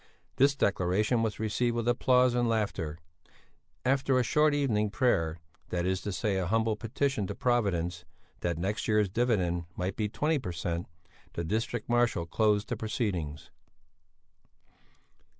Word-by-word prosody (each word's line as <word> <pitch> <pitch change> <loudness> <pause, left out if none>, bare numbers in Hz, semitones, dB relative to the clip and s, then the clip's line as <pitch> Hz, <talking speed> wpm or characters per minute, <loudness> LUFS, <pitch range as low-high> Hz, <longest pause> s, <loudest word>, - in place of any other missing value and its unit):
This 140 +1 +4
declaration 105 +1 +1
was 110 -2 -2
received 115 +2 0
with 120 0 -2
applause 125 +1 +4
and 120 -1 +1
laughter. 100 -8 -1 0.9
After 135 0 +2
a 125 - +3
short 150 +5 +3
evening 110 -7 +1
prayer, 85 -8 +1 0.3
that 90 -1 -1
is 95 0 0
to 105 - -3
say 100 0 -1
a 90 -2 -1
humble 110 +2 +1
petition 115 0 -1
to - - -5
Providence 90 -8 0 0.4
that 85 -2 -1
next 100 +6 -2
year's 105 -2 +3
dividend 95 -6 0
might 90 +1 -2
be 105 -1 -1
20 150 +7 0
per 90 -9 -5
cent., 85 0 -3 0.5
the 85 - -3
district 110 +5 -2
marshal 120 -7 +2
closed 105 +4 +1
the 125 - -1
proceedings. 100 - -3
105 Hz, 145 wpm, -29 LUFS, 90-120 Hz, 0.9 s, This